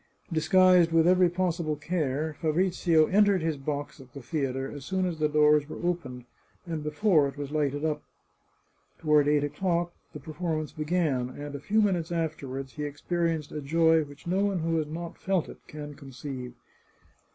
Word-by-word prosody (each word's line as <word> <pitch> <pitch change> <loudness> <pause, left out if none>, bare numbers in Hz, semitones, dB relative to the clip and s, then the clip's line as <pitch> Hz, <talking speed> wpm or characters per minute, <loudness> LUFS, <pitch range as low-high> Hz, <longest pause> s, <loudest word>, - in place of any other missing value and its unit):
Disguised 180 +1 +5
with 165 0 +4
every 180 0 +5
possible 170 -3 -1
care, 150 -1 -2
Fabrizio 170 0 +3
entered 200 -1 +3
his 160 -1 0
box 145 +1 -4
at 130 -1 -16
the 140 - -7
theatre 135 -2 -2
as 145 -2 -8
soon 190 +5 -1
as 170 -3 -3
the 155 -1 +2
doors 150 0 +4
were 175 - -6
opened, 130 -9 -3 0.4
and 165 -3 -4
before 155 0 +3
it 140 +1 -8
was 145 -1 -5
lighted 145 -1 0
up. 155 -1 -1 1.0
Toward 150 -2 +3
eight 145 -1 +3
o'clock 170 +3 -1 0.2
the - - -7
perform 160 0 -3
ance 155 - -7
began, 150 -6 0
and 145 +2 -8
a 140 - -5
few 215 +8 +2
minutes 175 -5 0
afterward 135 -5 -3
he 150 - -6
experienced 160 +1 -2
a 150 - -4
joy 160 +3 +3
which 145 +3 -13
no 185 +3 +1
one 195 -4 0
who 165 0 0
has 155 -2 -1
not 165 +2 -7
felt 190 -4 0
it - - -11
can 150 -1 -8
conceive. 135 -2 -8
155 Hz, 175 wpm, -28 LUFS, 145-175 Hz, 1.0 s, Disguised